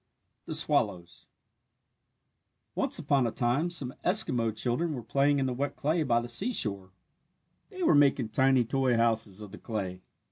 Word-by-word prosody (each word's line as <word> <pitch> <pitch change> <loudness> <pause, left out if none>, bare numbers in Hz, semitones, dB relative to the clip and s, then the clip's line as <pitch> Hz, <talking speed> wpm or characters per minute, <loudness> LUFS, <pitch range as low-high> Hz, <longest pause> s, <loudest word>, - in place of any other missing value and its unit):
THE - - -3
SWALLOWS 85 -1 -1 1.5
Once - - +3
upon 135 -4 +1
a - - -3
time 125 +10 0
some 135 -7 -1
Eskimo 160 - +4
children 125 +9 -1
were 120 - -7
playing 140 +5 +1
in 135 - 0
the 130 - -2
wet 140 +3 -3
clay 155 +3 -1
by 120 -6 +1
the 120 - -6
seashore. 120 - -2 0.8
They 375 -3 -6
were 325 - +4
making 140 -5 +3
tiny 130 +1 +2
toy 130 0 0
houses 115 -3 0
of 105 -2 -10
the 105 - -11
clay. 95 -5 -5
125 Hz, 155 wpm, -28 LUFS, 115-145 Hz, 1.5 s, Eskimo